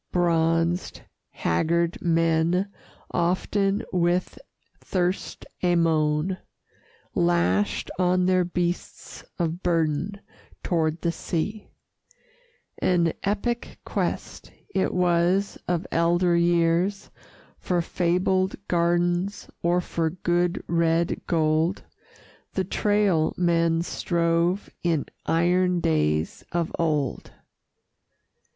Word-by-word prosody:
Bronzed, 165 0 +1 0.3
haggard 170 - 0
men, 165 +3 +2 0.4
often 195 +3 0
with 175 0 0 0.4
thirst 180 0 -2 0.2
a 175 -1 +3
moan, 160 +2 +1 0.7
Lashed 85 +3 +1
on 180 0 +3
their 185 0 +3
beasts 175 0 -4
of 170 0 -2
burden 165 +3 0 0.4
toward 160 -2 0
the 170 - +1
sea: 190 +6 -3 1.1
An 170 -3 +2
epic 235 +4 -2
quest - - -3 0.2
it 190 - +1
was 180 +2 +1
of 175 0 0
elder 175 +1 +2
years, 170 +3 +1 0.5
For 180 -1 0
fabled 185 +2 +1
gardens 175 +2 0
or 175 +1 +2
for 165 -2 -1
good, 175 +1 0
red 165 0 +1
gold, 160 +2 +1 0.7
The 190 - 0
trail 200 -4 +1
men 170 -1 +2
strove 170 +2 0
in 165 -4 0 0.2
iron 180 +2 +2
days 75 - 0
of 170 -1 -1
old. 150 -5 -1
170 Hz, 90 wpm, -25 LUFS, 165-180 Hz, 1.1 s, a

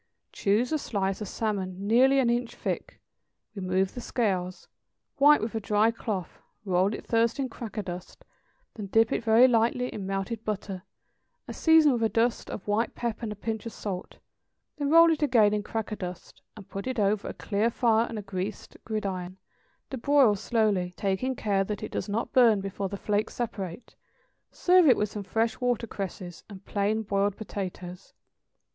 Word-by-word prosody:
= - - -54
Choose 215 +5 +1
a 310 - +1
slice 195 -5 -2
of 210 - -4
salmon 195 -3 -3
nearly 255 +6 +5
an 265 -3 +3
inch 240 0 -1
thick, - - -4 0.5
remove 190 -1 -1
the 245 - -6
scales, 185 -7 -2 0.5
wipe 295 +2 +6
with 220 +1 -3
a 225 - -1
dry 215 +1 +2
cloth, 210 -6 -5 0.3
roll 190 +2 +2
it - - -9
first 230 +1 +1
in 270 -2 -2
cracker 225 -2 -6
dust, 180 -1 -8 0.5
then 210 -3 -7
dip 225 +3 +3
it - - -1
very 230 +3 +6
lightly 245 +1 +1
in 195 -2 -5
melted 195 +4 -3
butter, 195 -3 -4 0.6
and - - -8
season 320 -3 +5
with 235 - -1
a 225 - +2
dust 230 +1 0
of 195 - -7
white 210 +3 0
pepper 235 -2 -3
and 225 -3 -3
a - - -5
pinch 220 +2 -4
of 230 - -7
salt; 190 -3 -6 0.6
then 285 -1 -1
roll 330 +1 +7
it 315 - -1
again 230 -8 +4
in 210 - 0
cracker 220 +1 -4
dust, 180 -3 -8 0.2
and 200 - -11
put 195 +5 -6
it 260 -1 -3
over 205 0 +1
a - - -4
clear 210 +3 0
fire 230 -1 +2
on 230 - -5
a 210 - -5
greased 195 +1 -5
gridiron, 190 -4 -4 0.5
to 265 - -4
broil 275 -4 +4
slowly, 200 -4 0
taking 205 +6 -1
care 200 -4 +1
that 205 0 -5
it - - -5
does 195 - -4
not 220 +3 -2
burn 235 -5 +5
before 195 0 -4
the 200 - -5
flakes 210 +1 -1
separate; 205 -4 -5 0.6
serve 360 -2 +4
it 250 - +6
with 210 - 0
some 210 - -6
fresh 225 +4 -1
watercresses 200 -7 -3
and 195 -2 -11
plain 210 +2 0
boiled 200 -1 0
potatoes. 185 -3 -7
215 Hz, 180 wpm, -27 LUFS, 195-235 Hz, 0.6 s, roll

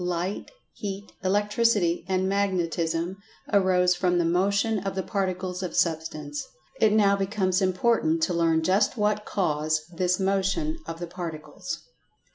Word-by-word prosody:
Light, 180 +2 -2 0.2
Heat, 200 -1 -6
Electricity 205 -2 +2
and 185 0 +1
Magnetism, 175 -3 0 0.4
arose 185 -2 +4
from 180 0 +1
the 170 - +2
Motion 200 +5 +2
of 195 0 -4
the 190 - -1
Particles 185 -2 -2
of 180 -3 -4
Substance. 155 -3 -1 0.4
It 220 - +4
now 205 -2 +4
becomes 195 -1 0
important 185 -4 +2
to 175 - +1
learn 165 -1 +2
just 195 +7 +2
what 210 0 +1
cause 155 -4 0
this 180 +2 +1
"Motions 195 - 0
of 165 - -5
the 175 - -3
Particles." 175 +1 -6
185 Hz, 135 wpm, -26 LUFS, 170-200 Hz, 0.4 s, arose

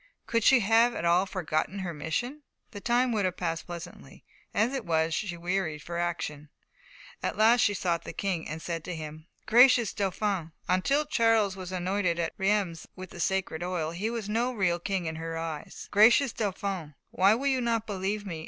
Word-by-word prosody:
Could 230 -1 0
she 260 +1 +6
have 225 +3 +4
at 170 - -3
all 175 +3 +3
forgotten 185 0 -2
her 185 -3 -4
mission, 240 - -3 0.3
the 205 - -8
time 245 +2 +2
would 215 -3 0
have 185 -1 -1
passed 165 -2 -3
pleasantly; 170 -1 -9 0.3
as 225 +6 +1
it 265 -3 -2
was, 160 -2 +1
she 175 -1 -2
wearied 170 -3 -2
for 170 0 -4
action. 155 -4 -3 0.7
At - - -2
last 225 +2 +5
she 205 - +3
sought 170 -3 -1
the - - -6
King, 185 -5 -3
and 160 +1 -6
said 165 -2 -4
to 180 - -4
him: 155 0 -8 0.2
"Gracious 245 -2 +6
Dauphin" 195 -4 -2
until 275 +12 +2
Charles 225 -7 +2
was 185 -1 -7
anointed 185 -1 0
at 165 -1 -2
Reims 190 -5 0
with 185 -1 -9
the - - -10
sacred 185 -2 -1
oil, 175 -3 -2
he 190 +6 -2
was 230 -3 -4
no 230 +4 0
real 185 -7 0
king 190 0 -2
in 160 0 -4
her 165 0 -4
eyes 165 -2 -6
"Gracious 235 +5 +5
Dauphin, 190 -7 -3 0.2
why 195 +3 +4
will 265 +4 -4
you 265 -2 +2
not 230 -2 0
believe 205 0 -3
me? 170 -5 -5
190 Hz, 190 wpm, -28 LUFS, 170-220 Hz, 0.7 s, she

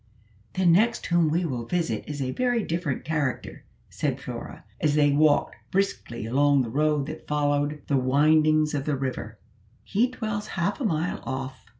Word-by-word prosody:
"The 185 - +1
next 210 +7 +3
whom 170 -2 +3
we 170 +3 +1
will 125 -6 -4
visit 170 +1 -1
is 145 -2 -3
a 130 - -2
very 245 - 0
different 165 -6 -3
character," 150 -5 -3 0.3
said - - -2
Flora, - - -8 0.2
as 150 -1 +1
they 145 -1 +4
walked 145 0 +3
briskly 185 - -2
along 140 +3 +3
the 115 - -5
road 150 +1 +1
that 155 +2 -8
followed 145 0 0
the 140 - +1
windings 155 +3 +3
of 140 -2 -2
the 150 - 0
river; 130 -5 -4 0.5
"he 230 +5 +1
dwells 215 -4 -4
half 195 +8 -1
a - - 0
mile 165 -2 -1
off." 130 -2 -6
150 Hz, 170 wpm, -26 LUFS, 140-170 Hz, 0.5 s, they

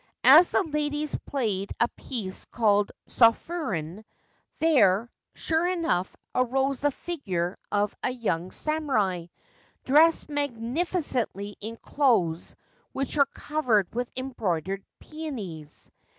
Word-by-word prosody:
As 310 +7 +8
the - - +2
ladies 300 -2 -2
played 210 -8 -2
a 235 - +4
piece 205 -7 -4
called 205 -3 +2
* - - -58
Sofuren,' 220 - +1 0.5
there, 240 - +3 0.2
sure 325 +2 +1
enough, 330 - -1 0.2
arose 265 +2 +1
the 290 - +3
figure 195 - -3 0.2
of 205 0 +1
a - - 0
young 185 -9 -2
samurai, 220 - 0 0.6
dressed 315 +5 +5
magnificently 260 - -2
in 225 +2 -6
clothes 205 - +1 0.4
which 275 +2 -2
were 280 -2 +4
covered 250 - 0
with 245 +1 -2
embroidered 195 - -2
peonies. 210 - -7
245 Hz, 110 wpm, -27 LUFS, 195-295 Hz, 0.6 s, As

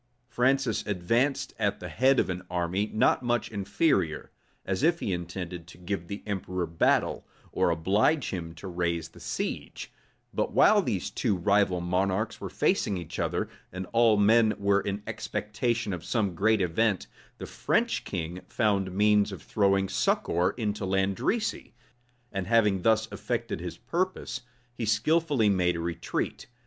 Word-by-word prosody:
Francis 130 +3 +1
advanced 115 +9 0
at - - 0
the - - -6
head 130 +2 +3
of - - +2
an 90 0 -3
army 90 +4 -1
not 110 +4 +3
much 120 -2 -1
inferior; 100 - 0 0.3
as 95 +3 -1
if 170 +3 +3
he 95 - -1
intended 90 -1 -5
to - - -13
give 90 -1 -4
the 100 - -6
emperor 90 -3 -2
battle, 80 0 +1 0.3
or - - +2
oblige 100 - +2
him 85 -3 -5
to 95 - -9
raise 85 -2 -2
the - - -16
siege: - - -4 0.4
but - - -1
while - - +6
these - - -2
two 100 - 0
rival 100 0 +2
monarchs 95 +4 -1
were - - -4
facing 100 - +1
each 85 -3 -7
other, - - -1 0.2
and 95 +1 -5
all 115 -2 +5
men 110 +2 +4
were 100 0 +2
in 100 +1 -4
expectation 110 0 -2
of 90 - -5
some 105 -6 0
great 105 +4 +2
event, 95 +3 +1 0.3
the - - -6
French - - 0
king 85 +3 -4
found 100 -4 +1
means 105 +1 +3
of 95 - -8
throwing 100 -2 +2
succor 90 +1 +1
into 105 -3 -2
Landrecy; 95 - -1 0.6
and 95 -2 -3
having 105 -4 +3
thus 110 +2 +3
effected - - -3
his - - -6
purpose, 185 -6 -2 0.3
he 120 - -5
skilfully 130 +3 +2
made 90 -3 +2
a - - -3
retreat. 85 0 -3
100 Hz, 155 wpm, -28 LUFS, 90-110 Hz, 0.6 s, while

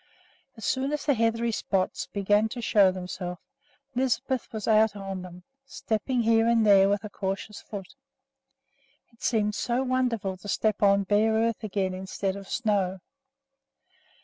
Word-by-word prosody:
As 220 - -7
soon 265 +2 0
as 300 - -3
the 285 - +4
heathery 230 0 +1
spots 195 -3 -1
began 205 +2 +1
to 240 - -6
show 205 -4 +4
themselves, 180 -1 -6 0.5
Lisbeth 260 0 -1
was 220 -3 -5
out 220 -1 +4
on 195 -2 -5
them, 180 0 -11 0.2
stepping 235 +2 -1
here 225 0 +3
and 230 -1 +3
there 195 -1 +6
with 205 +1 0
a 210 - -6
cautious 195 +2 -4
foot. 195 -3 -8 1.2
It 230 - -26
seemed 210 -3 +1
so 245 +4 -1
wonderful 245 -7 -1
to 185 - -12
step 215 +1 0
on 200 -1 +4
bare 210 +3 +2
earth 225 0 0
again 195 -3 -1
instead 190 +1 -3
of 200 -1 -9
snow! 195 -6 0
210 Hz, 150 wpm, -27 LUFS, 195-230 Hz, 1.2 s, there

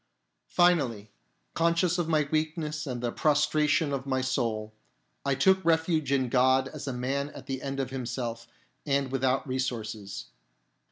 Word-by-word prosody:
Finally, 135 - +2 0.4
conscious 170 +1 +2
of 170 -2 -1
my 155 -3 +2
weakness 155 -1 -1
and 125 -2 -3
the 120 - 0
A - - -4
prostration 150 +1 +2
of 135 0 -3
my 130 -1 +1
soul, 115 -5 -1 0.5
I 140 -1 +1
took 190 +8 +4
refuge 160 -3 +2
in 130 -2 +2
God 130 +2 +3
as 150 -2 -8
a - - -1
man 135 +3 -2
at - - -9
the 130 -1 -4
end 135 0 -4
of 130 -2 -2
himself 120 -2 -4 0.4
and 140 -2 0
without 135 +1 +1
resources. 110 - -3
135 Hz, 155 wpm, -28 LUFS, 125-155 Hz, 0.5 s, took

